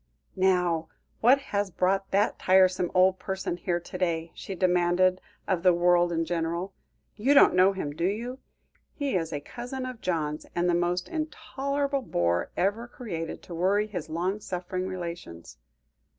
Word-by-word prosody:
"Now, 180 -4 +2 0.3
what 250 +4 +6 0.2
has 200 -1 +1
brought 190 +2 0
that 205 +3 +1
tiresome 185 -1 +4
old 185 0 +4
person 190 -2 -3
here 175 0 -1
to 175 +1 -8
day," 165 -2 -1
she 195 - -7
demanded 180 0 +2 0.3
of 185 -4 +1
the 180 -1 +5
world 175 0 +3
in 165 -1 0
general; 170 +2 -2 0.4
"you 265 +7 +3
don't - - +7
know 185 +2 +5
him, 170 -7 -4
do 170 +3 -2
you? 240 +6 -3 0.6
He 280 -7 -1
is 165 -3 -1
a 145 - -2
cousin 250 - -6
of 255 -3 -7
John's; 155 -4 -2
and 175 +1 +1
the 175 - +3
most 175 +1 0
intolerable 280 -3 -2
bore 85 - 0
ever 210 +5 0
created 175 -10 -6
to 175 - -9
worry 195 +5 +2
his 180 -7 -6
long 180 +6 -1
suffering 185 -1 -4
relations." 170 - -7
185 Hz, 160 wpm, -27 LUFS, 170-205 Hz, 0.6 s, don't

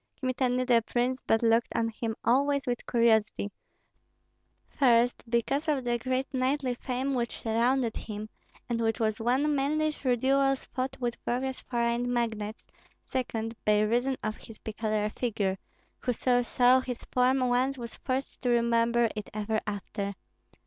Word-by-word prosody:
Kmita 255 -1 0
knew 250 +1 +1
the 240 -2 +4
prince, 250 +3 -1
but 225 +1 +1
looked 230 0 +4
on 230 0 +1
him 225 0 -4
always 280 +4 +3
with 245 -2 -3
curiosity: 220 -3 +2 1.2
first, 245 -3 +3
because 260 +6 0
of 285 -4 +1
the 240 -1 0
great 255 +2 -1
knightly 260 0 +1
fame 255 +2 -2
which 240 -2 -2
surrounded 235 +1 +1
him, 215 -1 -6 0.4
and 235 -1 -1
which 225 -1 0
was 220 -1 0
won 265 +6 +2
mainly 305 +3 +1
through 255 -4 0
duels 270 +2 +2
fought 265 +1 -3
with 240 -1 -2
various 260 +2 -2
foreign 235 0 0
magnates; 220 -3 -2 0.4
second, 225 -3 -3
by 210 0 +4
reason 245 +5 +1
of 215 0 -2
his 225 - -12
peculiar 215 -1 -2
figure, 200 -6 -1 0.4
whoso 245 0 +1
saw 250 +1 +4
his 250 -2 -5
form 255 +1 +3
once 255 +2 +1
was 235 -2 -7
forced 265 +1 -3
to 250 - 0
remember 235 0 +3
it 210 - -5
ever 215 +1 -1
after. 200 0 -4
240 Hz, 150 wpm, -29 LUFS, 225-260 Hz, 1.2 s, the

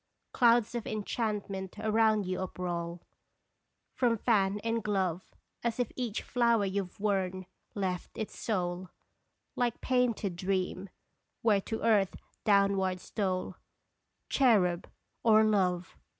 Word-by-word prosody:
Clouds 235 -2 +4
of 235 -2 -4
enchantment 205 -3 -3
around 215 -1 +2
you 185 0 -2
uproll 175 -2 -4 0.9
From 235 -3 +2
fan 205 -3 +2
and 230 -1 -1
glove, 190 -4 -1 0.3
As 235 0 -1
if 245 - 0
each 240 -4 -3
flower 235 -4 +2
you 195 0 -1
Ve 180 - -17
worn 190 -3 -1 0.3
left 185 -3 -3
its 220 - -4
soul, 180 -3 -2 0.7
Like 240 -2 0
painted 245 -7 +1
dream, 185 +1 -2 0.5
where 210 -3 +4
to 220 +3 -4
Earth 210 -4 +3 0.3
downward 195 -3 +3
stole 185 -1 -2 0.7
Cherub, 195 -10 +3 0.3
or 220 -1 +6
Love 185 -4 +1
200 Hz, 115 wpm, -31 LUFS, 185-225 Hz, 0.9 s, or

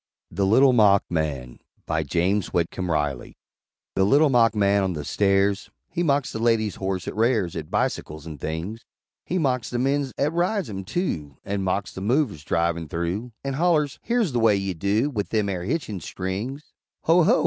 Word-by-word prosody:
THE 95 +3 0
LITTLE 130 +6 +5
MOCK 105 -4 +5
MAN 70 -7 -2 0.3
BY 80 0 0
JAMES 90 +7 +1
WHITCOMB 90 +1 -1
RILEY 75 -5 -2 0.6
The 95 - +2
Little 140 +8 +4
Mock 115 -3 +4
man 100 -1 +3
on 95 -1 0
the 75 -2 -5
Stairs 100 +1 +1 0.2
He 175 - -2
mocks 145 -5 +1
the 110 - -4
lady's 115 -2 +1
horse 95 -2 -3
'at - - -4
rares 110 -6 +1
At 80 -2 -5
bi - - +2
sickles 75 0 -8
an' 80 -3 -8
things, 85 - -4 0.4
He 185 - 0
mocks 130 -8 0
the 120 - -2
mens 135 +2 0
'at 150 +3 +1
rides 175 - 0
'em, 95 -1 -5
too; 80 - -3
An' 100 0 -2
mocks 95 0 -1
the 95 - -7
Movers, 110 - 0
drivin' 85 +1 0
through, 90 - -3
An' 135 0 -2
hollers 155 -2 +1
"Here's 235 - +1
the 120 - 0
way 110 -2 +5
you 95 -1 -2
do 100 - 0
With 105 -6 -3
them 105 -2 +1
air 90 -3 -3
hitchin' 115 - -2
strings!" 100 - -5 0.3
"Ho! 170 +2 +5
ho!" 160 - +4
100 Hz, 190 wpm, -24 LUFS, 90-130 Hz, 0.6 s, LITTLE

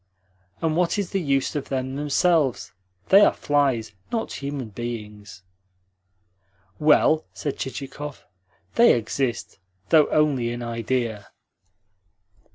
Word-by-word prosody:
And 160 -1 +1
what 175 +2 +1
is 200 -3 -2
the 195 - 0
use 140 -3 0
of 145 - -4
them 130 0 -2
themselves? 150 -1 +1 0.4
They 195 +2 +8
are - - +6
flies, 135 -7 0 0.2
not 225 -2 -2
human 140 -4 -4
beings." 105 -3 -7 1.4
"Well," 155 +1 +4
said 145 - -4
Chichikov, 140 +1 -6 0.5
"they 235 +1 +6
exist, 115 -2 -3 0.3
though 155 -2 +5
only 140 -6 +2
in 120 0 -5
idea." 115 -2 -2
135 Hz, 110 wpm, -24 LUFS, 120-150 Hz, 1.4 s, They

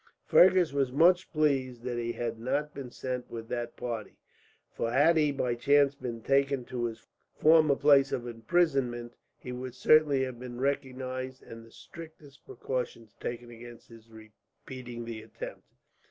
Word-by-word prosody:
Fergus 180 -4 +5
was 135 -3 0
much 175 +6 +4
pleased 135 -6 0
that 120 -1 -3
he 120 0 -2
had 115 -1 -4
not 145 +5 -2
been 135 -3 -7
sent 125 0 -5
with 115 -1 -7
that 120 -1 -4
party, 115 -3 -5 0.5
for 115 - -2
had 145 +7 +4
he 150 -2 +3
by 125 -3 -1
chance 140 +3 +3
been 115 -4 -7
taken 135 -2 +1
to 120 -1 -3
his 115 -1 -6 0.3
former 155 -2 +5
place 140 -1 +4
of 120 - -2
imprisonment, 120 -1 0 0.2
he 125 - -8
would 125 0 -6
certainly 150 -2 +4
have 130 -2 -5
been 125 -1 -8
recognized, 130 -1 -3
and 115 0 -11
the 115 - -17
strictest 155 -3 -13
precautions 120 -4 -5
taken 120 0 -6
against 120 0 -12
his 115 -1 -16
repeating 120 +2 -11
the 115 -1 -6
attempt. - - -9
130 Hz, 155 wpm, -29 LUFS, 120-140 Hz, 0.5 s, Fergus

